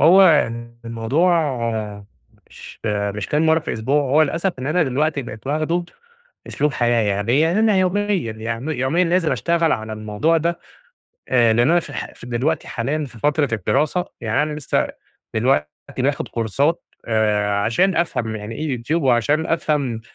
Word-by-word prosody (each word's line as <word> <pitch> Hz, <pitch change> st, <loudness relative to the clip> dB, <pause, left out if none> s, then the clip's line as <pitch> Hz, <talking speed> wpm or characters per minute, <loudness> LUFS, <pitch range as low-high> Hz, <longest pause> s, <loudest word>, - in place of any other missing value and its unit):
هو 180 Hz, +7 st, +7 dB
ال 120 Hz, -9 st, +2 dB
الموضوع 135 Hz, +4 st, +1 dB, 0.9 s
مش -, -, -13 dB
مش 100 Hz, -1 st, -2 dB
كام 155 Hz, +2 st, +1 dB
مرة 160 Hz, +1 st, +4 dB
في 155 Hz, -, -9 dB
الأسبوع، 135 Hz, +7 st, +1 dB
هو 145 Hz, +4 st, +3 dB
للأسف 170 Hz, +5 st, 0 dB
إن 130 Hz, -, -4 dB
أنا 170 Hz, +3 st, +2 dB
دلوقتي 145 Hz, +1 st, 0 dB
بقيت 110 Hz, +1 st, -9 dB
واخدُه 155 Hz, +4 st, 0 dB, 0.6 s
أسلوب 150 Hz, -1 st, -1 dB
حياة، 120 Hz, -1 st, +2 dB
يعني 100 Hz, +3 st, 0 dB
إيه، 145 Hz, +4 st, +4 dB
يعني 170 Hz, +6 st, +2 dB
أنا 215 Hz, -3 st, +3 dB
يوميًا 190 Hz, +2 st, +1 dB, 0.3 s
يعن 115 Hz, +5 st, -5 dB
يوميًا 150 Hz, +5 st, +1 dB
لازم 170 Hz, -3 st, +1 dB
أشتغل 165 Hz, +7 st, +1 dB
على 110 Hz, 0 st, -3 dB
الموضوع 110 Hz, +10 st, 0 dB
ده. 170 Hz, +2 st, -1 dB, 0.7 s
آآ، 115 Hz, -3 st, +4 dB
لأن 120 Hz, +5 st, +3 dB
أنا 175 Hz, -, +5 dB
في -, -, -10 dB
الح -, -, -6 dB
ف -, -, -12 dB
دلوقتي 130 Hz, +6 st, -1 dB
حاليًا 145 Hz, +6 st, -2 dB
في 120 Hz, -4 st, -13 dB
فترة 150 Hz, +1 st, +1 dB
الدراسة، 145 Hz, -, 0 dB, 0.2 s
يعني 115 Hz, +6 st, +1 dB
أنا 150 Hz, -, -3 dB
لسه 140 Hz, -, 0 dB, 0.5 s
دلوقتي 110 Hz, -, +2 dB, 0.3 s
باخد -, -, 0 dB
كورسات 135 Hz, -, 0 dB, 0.2 s
آآ 105 Hz, -2 st, +1 dB
،عشان 180 Hz, -, +2 dB
أفهم 120 Hz, -10 st, -1 dB
يعني 105 Hz, +2 st, -6 dB
إيه 150 Hz, -5 st, -2 dB
Youtube، 115 Hz, +6 st, -8 dB
وعشان 135 Hz, +5 st, +2 dB
أفهم 145 Hz, -8 st, -1 dB
135 Hz, 165 wpm, -21 LUFS, 115-160 Hz, 0.9 s, هو